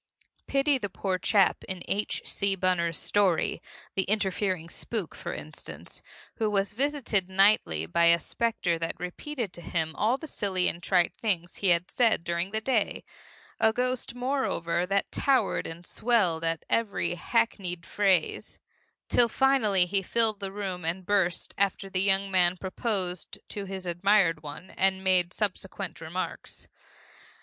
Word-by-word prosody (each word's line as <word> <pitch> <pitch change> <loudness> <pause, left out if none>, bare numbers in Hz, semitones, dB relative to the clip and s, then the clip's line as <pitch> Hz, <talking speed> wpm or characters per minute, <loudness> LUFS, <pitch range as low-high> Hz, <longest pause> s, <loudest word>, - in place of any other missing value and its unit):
Pity 275 0 +2
the 205 - -3
poor 185 0 -2
chap 195 +1 +3
in 185 -2 -5
H. 205 +1 -1
C. 200 -1 0
Bunner's 175 -3 +1
story, 195 -5 +1 0.3
The 195 - +2
Interfering 190 -4 0
Spook, 205 +1 -3
for - - -6
instance, - - -8 0.4
who 220 -2 +1
was 200 0 0
visited 245 -7 0
nightly 190 - +3
by 130 - +2
a 170 0 +6
specter 185 -6 -1
that 165 0 -3
repeated 210 +4 -5
to 175 - -9
him 160 -2 -2
all 230 +5 +2
the 315 - -8
silly 190 -8 0
and 170 - -2
trite 175 -1 +2
things 175 -6 -1
he 200 - 0
had 175 0 +3
said 230 -8 +3
during 170 +2 -1
the 220 +2 -2
day, 225 -3 0 0.6
a 220 - +5
ghost, 250 +1 -2
moreover, 245 -10 -1
that 200 +1 0
towered 275 -2 +1
and 165 +2 -8
swelled 190 -10 +1
at 165 -1 -1
every 200 -6 0
hackneyed 180 -2 -1
phrase, 190 -5 +1 0.5
till 240 -1 +4
finally 225 -9 +4
he 195 +2 +1
filled 220 +1 +1
the 195 -1 -5
room 190 -3 -4
and 175 +3 -2
burst 190 -4 +1
after 195 0 0
the 185 -1 +1
young 195 0 +2
man 180 -1 +4
proposed 185 -2 -3
to 200 -1 -5
his 190 -1 -5
admired 175 -2 +3
one, 150 +5 -9
and 190 0 +1
made 180 -2 +3
subsequent 195 -4 -3
remarks. 165 +3 -5
195 Hz, 150 wpm, -28 LUFS, 175-215 Hz, 0.6 s, a